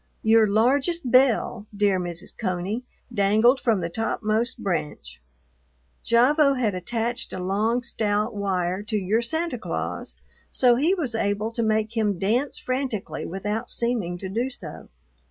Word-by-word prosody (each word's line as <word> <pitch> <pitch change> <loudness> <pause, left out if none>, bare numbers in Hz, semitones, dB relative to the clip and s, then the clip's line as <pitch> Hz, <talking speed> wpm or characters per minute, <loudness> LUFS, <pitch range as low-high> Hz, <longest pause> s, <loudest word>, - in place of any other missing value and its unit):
Your 220 0 +5
largest 260 - +1
bell, 245 -4 +3
dear 200 -2 +2
Mrs. 175 -1 -2
Coney, 190 +3 -2 0.3
dangled 220 +5 +4
from 225 -7 +1
the 170 - -2
topmost 225 +2 -1
branch. 150 - -4 0.9
Gavotte 275 +4 +4
had 220 -5 +1
attached 230 +5 -1
a - - -4
long, 210 +6 0
stout 210 0 0
wire 190 -2 -1
to 215 +1 -2
your 205 +4 +1
Santa 320 +1 -2
Claus, - - -4 0.3
so 245 -2 +4
he 315 +10 +2
was 290 -10 -3
able 210 0 -1
to 230 - -3
make 220 0 0
him 210 -4 +1
dance 230 +10 0
frantically 255 -5 -3
without 210 +6 -3
seeming 225 -8 -1
to 190 - -6
do 235 +7 -1
so. 180 - -8
220 Hz, 140 wpm, -24 LUFS, 195-245 Hz, 0.9 s, Your